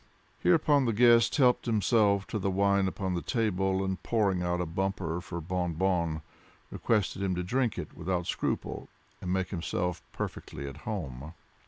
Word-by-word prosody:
Hereupon 140 - +4
the 115 - +1
guest 115 +1 +5
helped 125 -4 +3
himself 105 -2 +3
to 110 - -2
the 100 - 0
wine 100 0 +2
upon 95 0 -2
the 85 - -1
table, 95 -4 0
and 95 0 -3
pouring 100 -6 +1
out 90 0 0
a 90 - 0
bumper 90 -1 -2
for 85 -1 -6
Bon 90 0 -2
Bon, 85 -3 0 0.5
requested 105 -3 0
him 95 -2 0
to 90 - -2
drink 120 +4 0
it - - -6
without 90 0 -2
scruple, - - -3 0.3
and 90 - -3
make 95 0 0
himself 90 -1 -2
perfectly 70 +1 -5
at 70 +1 -8
home. 80 - -5
95 Hz, 165 wpm, -29 LUFS, 90-105 Hz, 0.5 s, guest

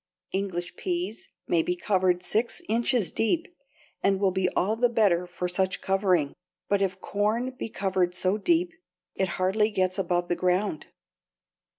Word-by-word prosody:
English 185 -3 -3
peas 350 - -3 0.2
may 170 - +3
be 180 +2 -1
covered 185 -1 +1
six 225 +5 -1
inches 230 -4 +1
deep 320 +10 +1 0.5
and 195 -1 +2
will 195 -1 +3
be 185 0 +1
all 210 +4 +2
the 245 +1 +3
better 195 -6 +2
for 180 0 -3
such 190 +1 0
covering, 190 -7 +1 0.3
but 200 -1 +2
if 190 -1 0
corn 215 +7 0
be 255 -3 -6
covered 185 -3 0
so 185 +2 +1
deep, 335 - +2 0.4
it 190 - 0
hardly 195 +4 +2
gets 185 -2 0
above 175 -1 0
the 175 - 0
ground. 180 -1 0
195 Hz, 155 wpm, -27 LUFS, 180-220 Hz, 0.5 s, may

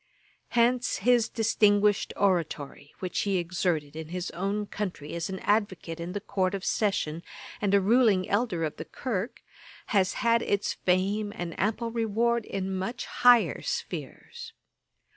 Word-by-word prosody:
Hence 245 +1 +3
his 240 +2 +3
distinguished 210 -2 +2
oratory, 160 -7 -1
which 185 -1 -2
he 200 -2 +1
exerted 170 -4 -1
in 160 -1 -6
his 180 +2 -4
own 200 +4 -2
country 185 -8 -5
as 170 +1 -3
an 190 - -4
advocate 190 -6 0
in 170 +2 -5
the 205 - -2
Court 190 -1 -1
of 195 - -5
Session, 195 -7 0 0.4
and 205 -2 +1
a - - +6
ruling 205 -2 +3
elder 200 -5 0
of 155 - -3
the - - -6
Kirk, 230 -3 -4 0.5
has 195 -2 +3
had 230 0 +2
its 200 -2 0
fame 200 +3 0
and 175 -5 -4
ample 225 +4 0
reward, 230 +1 0
in 190 0 -3
much 230 +6 -3
higher 245 -2 +4
spheres. 475 -1 -6
200 Hz, 145 wpm, -28 LUFS, 180-225 Hz, 0.5 s, a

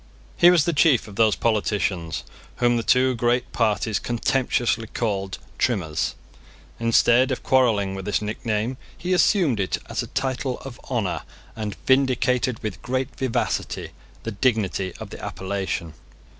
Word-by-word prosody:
He 175 - +7
was 175 -4 +4
the 170 - +1
chief 145 -5 +4
of 105 - -11
those 110 0 +4
politicians 100 -6 -1 0.3
whom 120 0 +2
the 115 - +1
two 130 +2 +3
great 120 +1 0
parties 110 -1 +1
contemptuously 120 -1 0
called 100 -4 -2 0.2
Trimmers. 90 - 0 0.6
Instead 115 +2 +4
of 130 - -3
quarrelling 110 -7 +3
with 95 -1 -6
this 105 - +1
nickname, 110 +3 -2 0.2
he 180 +1 -1
assumed 175 - +3
it 95 - 0
as - - -2
a - - -6
title 130 -1 -2
of 130 -3 -9
honour, 115 -8 -1 0.3
and 105 -3 -4
vindicated, 130 -2 +2
with 105 -4 -4
great 130 +1 -2
vivacity, 130 -3 -2 0.3
the 115 - -3
dignity 100 -4 0
of - - -8
the - - -9
appellation. 95 -4 -3
115 Hz, 145 wpm, -24 LUFS, 105-130 Hz, 0.6 s, He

